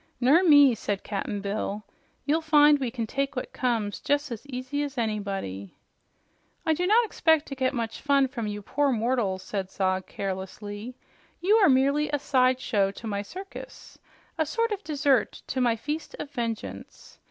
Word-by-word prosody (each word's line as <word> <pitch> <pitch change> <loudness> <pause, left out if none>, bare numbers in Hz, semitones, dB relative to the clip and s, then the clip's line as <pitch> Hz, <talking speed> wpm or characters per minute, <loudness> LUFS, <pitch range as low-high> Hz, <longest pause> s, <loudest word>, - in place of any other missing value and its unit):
"Ner 270 +8 +5
me," 290 -6 +7
said 205 -3 -3
Cap'n 205 0 -3
Bill. 205 +1 -3 0.4
"You'll 310 +3 +2
find 295 -2 +5
we 260 -3 -1
can 230 -1 -3
take 275 +4 -2
what 250 - -5
comes 225 -5 -1
jes' 290 -1 +1
as 235 +4 -7
easy 255 +2 -3
as 290 -1 -4
anybody." 195 - -3 0.9
"I 320 - +3
do 355 +3 -1
not 455 +4 +5
expect 320 -7 +2
to - - -4
get 260 -1 +1
much 230 -2 -3
from 270 -5 +1
you 205 0 -5
poor 285 +6 +1
mortals," 225 -5 0
said 190 -1 -4
Zog 185 -1 -1
carelessly. 205 +4 -6 0.4
"You 405 +5 +4
are 395 -6 +5
merely 280 +3 +3
a 290 - 0
side 255 -2 +2
show 200 -5 +1
to 200 - -10
my 200 -2 -2
circus, 375 - -10 0.4
a 315 - +3
sort 460 +6 0
of 410 -1 -3
dessert 280 -6 +1
to 260 - -2
my 240 -2 +3
feast 300 +7 -5
of 285 - -7
vengeance. 230 -5 -6
255 Hz, 170 wpm, -26 LUFS, 210-290 Hz, 0.9 s, me